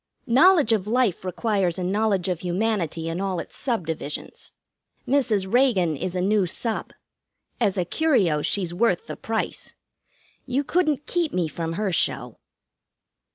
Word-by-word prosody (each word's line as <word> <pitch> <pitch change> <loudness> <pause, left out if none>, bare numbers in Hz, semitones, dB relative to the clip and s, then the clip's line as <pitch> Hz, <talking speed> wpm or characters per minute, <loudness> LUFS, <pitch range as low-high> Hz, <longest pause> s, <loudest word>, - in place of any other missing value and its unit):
"Knowledge 280 - +5
of 210 -2 0
life 230 -6 +1
requires 190 -2 0
a 185 - -3
knowledge 195 -1 +1
of 180 -3 -1
humanity 180 -3 -1
In 165 +3 -3
all 190 -3 -1
its - - -8
subdivisions. 165 - -4 0.6
Mrs. 245 -8 +2
Reagan 215 - +3
is 180 +6 -4
a 180 - 0
new 200 0 +2
sub. 225 +5 -3 0.7
As 195 -1 +1
a 180 - +1
curio, 195 - +2
she's 180 +1 0
worth 190 -1 +1
the - - -6
price. 225 0 -4 0.7
You 265 +3 0
couldn't 305 -3 0
keep 340 -4 -1
me 175 -3 +1
from 165 +1 -4
her 200 +2 -1
show." 170 - 0
195 Hz, 145 wpm, -24 LUFS, 175-240 Hz, 0.7 s, Knowledge